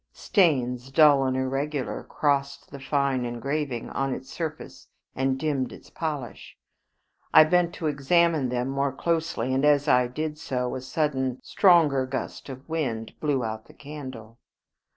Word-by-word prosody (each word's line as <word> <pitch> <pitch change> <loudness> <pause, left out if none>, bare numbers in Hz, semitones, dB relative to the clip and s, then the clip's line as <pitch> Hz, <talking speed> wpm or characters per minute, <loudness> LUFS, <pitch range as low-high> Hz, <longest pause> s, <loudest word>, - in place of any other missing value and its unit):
Stains, 130 - +1
dull 145 -1 +5
and 130 0 0
irregular, 135 +2 -2
crossed 140 -1 -1
the 140 - -8
fine 135 -2 0
engraving 125 +1 -3
on 135 -1 -1
its 130 +1 -10
surface 160 -3 -6 0.3
and 130 0 0
dimmed 140 -3 -1
its - - -13
polish. 150 -8 -5 0.8
I - - +11
bent 175 +2 +2
to 165 - -5
examine 155 0 +2
them 125 0 -1
more 140 +1 0
closely, 165 -3 -1
and 135 +1 +1
as 145 0 +4
I 125 -3 +4
did 150 +4 -4
so 125 -4 -2
a 130 - -4
sudden 130 -2 -1
stronger 155 -9 +4
gust 130 +2 -5
of 130 0 -9
wind 130 -9 -3
blew 145 -5 0
out 110 0 -5
the - - -17
candle. 130 -6 -9
140 Hz, 150 wpm, -26 LUFS, 130-150 Hz, 0.8 s, I